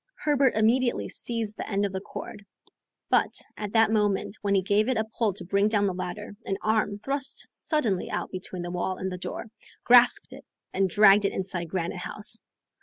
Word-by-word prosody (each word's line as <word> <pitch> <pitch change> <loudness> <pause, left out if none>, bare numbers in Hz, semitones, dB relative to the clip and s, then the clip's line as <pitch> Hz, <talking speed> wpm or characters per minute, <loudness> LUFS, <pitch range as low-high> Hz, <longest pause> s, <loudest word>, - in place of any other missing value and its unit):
Herbert 280 -3 +2
immediately 240 +3 +2
seized 225 -3 -3
the - - -5
end 200 0 +1
of 200 - -2
the 190 - -3
cord, 200 +1 -8 0.7
but, - - +3 0.2
at 210 -1 -5
that 225 -1 +4
moment 210 -2 +1
when 200 -1 +1
he 190 - +2
gave 205 +5 +2
it 260 - +1
a 220 - +2
pull 220 0 -1
to 180 -1 -6
bring 200 +3 +2
down 210 -2 +2
the 190 - 0
ladder, 185 +3 -6
an 195 - -2
arm, 215 -2 +1
thrust 270 +5 -3
suddenly 230 - -1
out - - -3
between 185 -1 -5
the 175 - -5
wall 180 +1 -2
and 190 0 -3
the 180 - -5
door, - - -5 0.4
grasped 245 0 +5
it - - -11 0.3
and 190 0 +2
dragged 205 +1 +6
it - - 0
inside 180 -3 -4
Granite 175 0 -3
House. 210 +4 -5
205 Hz, 195 wpm, -27 LUFS, 190-225 Hz, 0.7 s, dragged